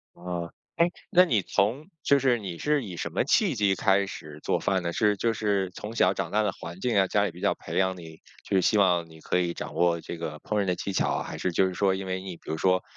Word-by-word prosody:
呃， 85 -1 -5 0.3
诶， 170 +1 +3 0.2
那 180 +1 +7
你 115 - +2
从， 110 - 0 0.2
就 140 0 +4
是 125 -3 +2
你 95 -5 -6
是 150 - +1
以 90 -5 -7
什 85 - -4
么 - - +1
契 175 - +2
机 100 -3 +2
开 100 0 +2
始 75 -5 -9
做 - - +1
饭 95 -2 0
呢？ 85 - -2
是 105 +3 +2
就 115 +2 +1
是 100 -4 0
从 110 +4 -7
小 95 -3 +4
长 85 -4 -3
大 110 - +2
的 105 -2 +1
环 85 0 -9
境 120 -1 0
啊， 95 -1 +4
家 - - +2
里 - - -1
比 - - -13
较 - - +2
培 - - -6
养 95 -1 +2
你 80 -2 -11 0.2
就 - - -2
是 - - +4
希 105 - +3
望 90 -4 +3
你 80 0 -14
可 - - 0
以 85 -1 0
掌 - - -6
握 85 -1 +2
这 85 - -7
个 75 -2 -5
烹 105 +5 -2
饪 - - 0
的 90 -1 0
技 100 - -4
巧 - - +1
啊？ - - -1
还 - - -7
是 95 - -1
就 90 +3 +3
是 95 - -4
说 95 +1 +2
因 95 0 -5
为 95 0 -3
你， 95 -3 -7
比 - - -13
如 80 - -2
说 95 +1 +2
95 Hz, 300 characters per minute, -27 LUFS, 85-105 Hz, 0.3 s, 那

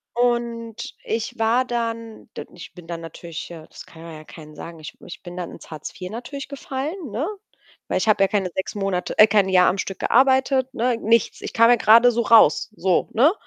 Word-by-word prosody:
Und 235 -1 -2
ich 225 0 -4
war 235 +3 +2
dann, 230 -2 -5
d - - -6
ich 175 - -11
bin 175 -2 -14
dann 170 -1 -6
natürlich 165 0 -8
ja, 160 -2 -11
das - - -13
kann 165 - -15
man 165 -1 -10
ja 155 - -11
keinem 155 -2 -13
sagen, 165 -1 -9
ich 155 - -9
ich 175 - -10
bin 175 0 -9
dann 175 -2 -5
ins - - -13
Hartz 155 -1 -7
4 180 -1 -8
natürlich 255 +4 -7
gefallen, 280 - -5
ne? 250 +9 -2 0.6
Weil - - 0
ich - - -2
habe 205 -2 +3
ja 195 - +4
keine 195 -4 -1
6 190 - -4
Monate 195 -3 -3
äh, 215 - +9
kein 205 -2 +2
Jahr 180 -1 +5
am 195 - 0
Stück 195 0 -4
gearbeitet, 265 +1 +2
ne, 240 0 0
nichts. 230 0 +1
Ich - - -7
kam 230 0 +5
ja 245 - +6
grade 230 +3 +6
so 235 0 0
raus, 230 0 +5
so, 185 -1 +1
ne? 280 +10 +4
220 Hz, 220 wpm, -22 LUFS, 180-240 Hz, 0.6 s, äh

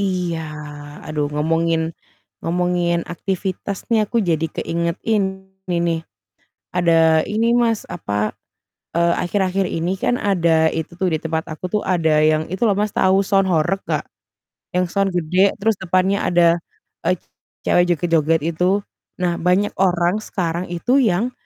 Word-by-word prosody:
Iya, 180 -4 -1 0.7
aduh 150 -1 -1
ngomongin 165 +1 +1 0.5
ngomongin 175 0 +1
aktivitas 190 +2 -4
nih, 220 -2 +3
aku 235 - -2
jadi 165 -2 +1
keingetin 190 +3 -1 0.2
ini 175 - +1
nih, 165 -1 0 0.8
ada 165 -2 +4
ini 230 +3 +1
Mas, 230 -3 +1
apa, 105 -9 -2 0.6
eee, 170 0 +3
akhir-akhir 190 +1 0
ini 175 +3 -1
kan 245 - +1
ada 165 -5 +3
itu 160 +1 -4
tuh 185 -1 +2
di - - +2
tempat 160 0 -2
aku 155 - -6
tuh 210 - +2
ada 160 -4 +2
yang 155 0 +3
itu 185 - -4
loh 200 - +3
Mas, 210 0 0
tahu 190 +1 +4
sound 195 -1 +2
horeg 170 +4 +1
nggak? - - 0 0.7
Yang 180 0 +3
sound 195 0 +2
gede 180 +4 +3
terus 220 +2 +2
depannya 190 +2 +1
ada, 170 -1 +4 0.5
eee, 180 - +4 0.5
cewek 175 - +5
joget-joget 165 -1 +2
itu. 185 +4 +2 0.4
Nah, 175 -1 +1
banyak 180 +4 +2
orang 180 0 +2
sekarang 175 -1 -2
itu 245 +10 +2
yang, 225 +4 +1
175 Hz, 145 wpm, -20 LUFS, 165-195 Hz, 0.8 s, cewek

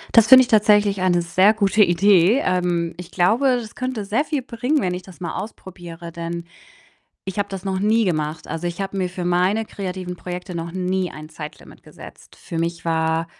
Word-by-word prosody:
Das 230 -1 +7
finde 260 0 +9
ich - - -5
tatsächlich 205 -3 +3
eine 175 -2 +2
sehr 185 +5 +4
gute 210 0 +3
Idee. 195 +6 +4
Ähm, 175 -2 0
ich 180 0 -10
glaube, 240 +9 +2
das 220 -3 -10
könnte 255 -5 -3
sehr 225 +9 +1
viel 295 -3 -2
bringen, 250 +5 -1
wenn 180 -8 -1
ich 180 - -5
das 180 -4 -15
mal 170 -2 -5
ausprobiere, 175 -4 -9
denn 170 0 -5 0.8
ich 195 +2 -3
habe 205 - -2
das 195 -1 -7
noch 190 -1 -2
nie 220 +2 +3
gemacht. 155 -3 -2
Also, 175 +2 -3
ich 170 +3 -6
habe 195 0 -4
mir 185 -2 0
für 180 0 -6
meine 180 +5 +1
kreativen 185 -3 -6
Projekte 180 +1 -7
noch 170 0 -4
nie 185 0 -2
ein 155 0 -10
Zeitlimit 155 -1 -11
gesetzt. - - -14
Für 170 - -8
mich 170 0 -3
war 160 0 0
185 Hz, 195 wpm, -21 LUFS, 170-210 Hz, 0.8 s, finde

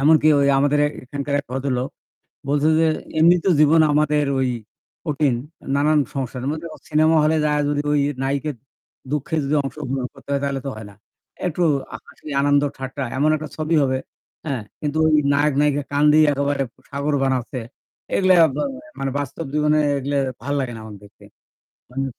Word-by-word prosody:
এমনকি 155 +2 +5
ওই 140 - +3
আমাদের 145 +1 +2
এ্যা - - +2 0.2
এখানকার 140 +2 -4
এক 140 - -25
ভদ্রলোক 130 -1 -1 0.6
বলছে 145 +1 +2
যে 165 - +4 0.3
এমনিত 170 +1 +5
জীবন 155 +2 +6
আমাদের 150 0 +2
ওই 130 - +1 0.6
কঠিন 145 -4 +1 0.4
নানান 150 +2 +3
সংসারের 130 -1 -4
মধ্যে 160 +2 -5
অ - - -15
সিনেমা 155 +1 +3
হলে 155 +1 +3
যাওয়া 150 0 +1
যদি 145 0 0 0.4
নাইকার 140 +2 -1 0.6
দুঃখে 150 +2 -2
যদি 140 +2 0
অংশগ্রহণ 135 -2 -4
করতে - - -17
হয় 140 - 0
তাহলে 140 -1 -1
তো - - -2
হয় 110 -1 -8
না। - - -15 0.5
একটু 175 0 0 0.4
হাসি - - -16
আনন্দ 145 0 +3 0.2
ঠাট্টা 135 +1 -5
এমন 150 +3 +3
একটা 155 0 -6
ছবি 155 +1 0
হবে। 130 -1 +1 0.5
হ্যাঁ 135 -6 -2 0.2
কিন্তু 150 0 -2
ওই 155 -1 +4 0.2
নায়ক-নায়িকা 145 0 +2
কেঁদে 150 +2 +4
একেবারে 140 0 0 0.3
সাগর 145 +1 -2
বানাচ্ছে। 130 0 -1 0.6
এগুলা 185 -1 +4 0.2
বা 150 - -1 0.4
মানে 135 0 -2
বাস্তব 145 +3 -5
জীবনে 150 0 +2 0.2
এগুলা 140 +1 -2 0.2
ভাল 140 +4 -3
লাগে 130 -3 -3
না - - -8
আমার 105 -2 -9
দেখতে। 100 - -18 0.7
মানে 135 +2 -2
145 Hz, 160 wpm, -21 LUFS, 135-150 Hz, 0.7 s, জীবন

